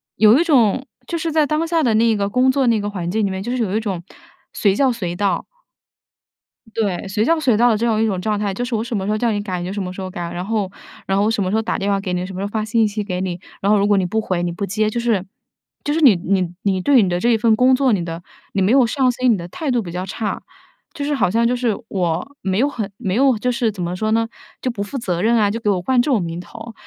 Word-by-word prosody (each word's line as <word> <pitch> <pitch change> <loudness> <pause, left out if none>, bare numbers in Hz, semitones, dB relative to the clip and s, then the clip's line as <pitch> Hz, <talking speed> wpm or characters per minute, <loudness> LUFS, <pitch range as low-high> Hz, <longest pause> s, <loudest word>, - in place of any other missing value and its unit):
有 215 +5 +6
一 - - +4
种 265 - +3 0.2
就 340 - -2
是 325 0 -2
在 310 -1 +3
当 305 +3 0
下 330 -1 +1
的 235 -4 +2
那 225 0 +3
个 200 0 0
工 255 +4 +3
作 270 0 +1
那 230 -2 +3
个 205 - -3
环 180 -4 -4
境 220 +2 0
里 - - 0
面， 190 0 -4
就 245 +4 -2
是 - - -2
有 200 -1 -2
一 - - +2
种 200 -6 -3 0.5
随 200 -3 +2
叫 265 +2 +3
随 185 -7 -4
到 195 -1 0 1.3
对 200 -4 -1
随 210 +3 0
叫 330 +4 +2
随 250 -8 +2
到 240 +2 +5
的 220 - +2
这 230 - -1
种 220 -2 +1
一 - - +3
种 190 -4 -1
状 210 +1 -1
态， 205 -2 -1
就 240 - -3
是 245 -1 -2
我 220 - -1
什 235 0 -4
么 190 -2 -2
时 210 - -1
候 215 - +1
叫 230 +1 +1
你 205 - -1
改， 185 -3 -4
你 175 - -4
就 185 - -4
什 205 - -3
么 180 - -4
时 185 - -9
候 185 - -4
改， 175 -2 -5
然 175 +1 -4
后 210 -2 -1 0.4
然 195 - 0
后 200 - +3
我 220 - +2
什 210 -3 0
么 185 - -1
时 205 - 0
候 220 - +2
打 225 - -2
电 200 -1 -2
话 200 -1 +1
给 190 -2 -3
你， 180 0 -1
什 190 - -8
么 185 - -6
时 195 - -2
候 - - -2
发 215 +1 -2
信 220 0 +2
息 210 0 -3
给 180 -3 -3
你， 180 -2 -3 0.2
然 200 - +2
后 210 - +5
如 200 0 +2
果 205 - +3
你 190 - +1
不 220 +5 -1
回、 185 -4 -2
你 175 - -1
不 185 +4 -3
接， 215 +2 0
就 235 - -2
是 230 -6 +1 0.6
就 290 - -1
是 320 - +1
你 255 -9 +7
你 180 0 -1
你 195 -2 +1
对 265 +3 +5
你 190 - +1
的 175 0 0
这 235 - +1
一 230 - +4
份 220 0 +3
工 255 +3 +4
作， 265 -1 +2
你 195 -5 +1
的 165 0 -6 0.3
你 195 - 0
没 190 +3 +3
有 260 -1 +5
上 255 +2 +2
心， 250 0 +2
你 205 - 0
的 170 - -7
态 285 - -3
度 245 -2 +1
比 175 - -7
较 180 +2 -4
差。 210 +2 -3 0.5
就 285 -3 -4
是 290 0 0
好 185 - +1
像 230 +1 +2
就 245 - +1
是 240 -3 0
我 185 +9 -2
没 190 +1 0
有 270 - +3
很 220 -8 -4
没 185 -1 -2
有 260 -1 +4
就 250 - -1
是 235 -2 0
怎 195 -3 -7
么 175 +1 -2
说 215 +3 -1
呢， 225 +1 +2 0.3
就 255 - -1
不 220 -5 -3
负 205 +7 -6
责 180 -8 -2
任 230 +2 +3
啊， 210 -2 +3
就 210 - -2
给 210 - 0
我 190 -3 +1
冠 250 +6 +2
这 280 - 0
种 230 -7 +2
名 165 0 -4
头。 225 +4 -10
215 Hz, 335 characters per minute, -20 LUFS, 190-240 Hz, 1.3 s, 你